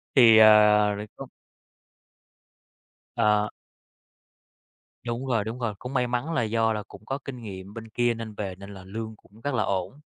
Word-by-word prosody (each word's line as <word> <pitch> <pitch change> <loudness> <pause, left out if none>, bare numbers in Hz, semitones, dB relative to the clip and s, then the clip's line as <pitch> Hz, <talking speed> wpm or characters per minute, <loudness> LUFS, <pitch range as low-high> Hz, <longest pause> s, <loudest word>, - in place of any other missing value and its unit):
Thì, 115 -4 +8
ờ, 110 0 +9 0.5
nói 105 +1 -6
chung - - -8 1.9
Ờ. 105 0 +2 1.6
Đúng 120 +2 -3
rồi, 115 -5 0
đúng 110 +4 -6
rồi, 115 -3 -2
cũng 125 +2 -7
may 125 -2 +1
mắn 125 +7 -2
là 140 - +1
do 115 0 +1
là 105 -1 -4
cũng 100 +1 -15
có 135 - -3
kinh 125 -3 -7
nghiệm 95 -2 -9
bên 115 0 -9
kia 120 +2 +1
nên 115 -1 -7
về 95 -3 -4
nên 100 +2 -11
là 95 -1 -11
lương 110 +3 -6
cũng 105 +1 -22
rất 145 +3 -2
là 110 -4 +1
ổn 95 +6 -3
110 Hz, 180 wpm, -26 LUFS, 105-120 Hz, 1.9 s, ờ